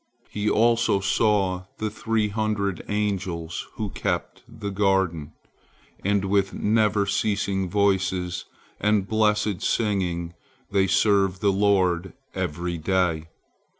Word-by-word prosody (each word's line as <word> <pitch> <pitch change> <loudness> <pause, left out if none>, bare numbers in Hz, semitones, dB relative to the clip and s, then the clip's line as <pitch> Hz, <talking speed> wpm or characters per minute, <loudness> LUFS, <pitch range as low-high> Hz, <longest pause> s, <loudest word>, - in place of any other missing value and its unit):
He 105 0 -1
also 115 -2 +3
saw 95 -2 +1
the 110 -1 -2
three 110 -1 0
hundred 105 -3 -1
angels 95 -5 -2
who 105 -3 -3
keep - - -1 0.2
the 100 -2 -6
garden, 95 -6 0 0.7
and 100 0 +1
with 95 0 +1
never 105 -1 +2
ceasing 100 -2 0
voices 95 -2 0 0.3
and 105 -2 +2
blessed 105 -2 +1
singing 90 -6 -1 0.4
they 95 -1 +3
serve 95 -1 +2
the 100 0 +3
Lord 95 -3 +2 0.2
every 85 +2 -3
day. 85 -2 0
100 Hz, 110 wpm, -24 LUFS, 90-105 Hz, 0.7 s, also